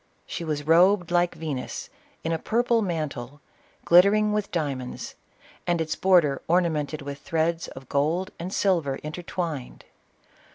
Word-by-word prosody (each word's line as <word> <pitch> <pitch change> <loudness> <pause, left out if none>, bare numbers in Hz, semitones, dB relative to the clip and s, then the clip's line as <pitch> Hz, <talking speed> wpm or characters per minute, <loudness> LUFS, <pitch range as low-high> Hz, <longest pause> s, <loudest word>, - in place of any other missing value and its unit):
She 170 - -5
was 150 -3 -3
robed 175 +2 +4
like 175 0 +2
Venus 145 -6 -5 0.3
in 165 - -1
a 165 - 0
purple 235 +3 +1
mantle, 150 - -4 0.5
glittering 205 +4 +5
with 210 -1 -1
diamonds, 140 -7 -3 0.5
and 175 -1 +2
its 160 -1 -1
border 170 -8 +3
ornamented 160 -4 +1
with 140 0 -6
threads 165 +2 -1
of 130 -1 -11
gold 155 +8 0
and 175 +2 -5
silver 170 -10 +1
intertwined. 155 -3 -5
165 Hz, 130 wpm, -26 LUFS, 145-180 Hz, 0.5 s, glittering